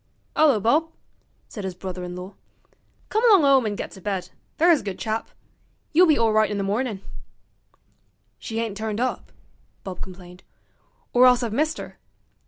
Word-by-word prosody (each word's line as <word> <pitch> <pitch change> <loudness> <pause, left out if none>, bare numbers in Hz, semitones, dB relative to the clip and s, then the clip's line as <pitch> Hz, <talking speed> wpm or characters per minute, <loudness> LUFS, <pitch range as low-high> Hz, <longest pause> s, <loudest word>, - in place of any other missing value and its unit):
''Ullo, 290 -8 +4
Bob,' 305 +10 +2 0.6
said 205 - -8
his 190 -2 -4
brother 185 0 -6
in 180 0 -6
law; 180 +2 -8 0.8
'come 435 +2 0
along 385 -8 +6
'ome 270 -4 +4
an' 205 - -2
get - - -6
to 190 - -13
bed, 185 -2 -3 0.3
there's 335 -1 +5
a - - -11
good 195 -3 -5
chap. 220 0 -3 0.6
You'll 355 +3 +6
be 310 - +4
awright 215 -1 +3
in 210 - -3
the 200 - -1
mornin'.' 210 0 -2 1.4
'She 225 -1 -4
ain't 225 -3 -3
turned 220 -1 -3
up,' 255 +1 -2 0.5
Bob 185 -2 -7
complained, 180 -1 -10 0.7
'or 250 +1 +7
else 250 0 +4
I've 225 -3 -3
missed 310 +5 0
'er. - - -9
220 Hz, 170 wpm, -24 LUFS, 190-265 Hz, 1.4 s, or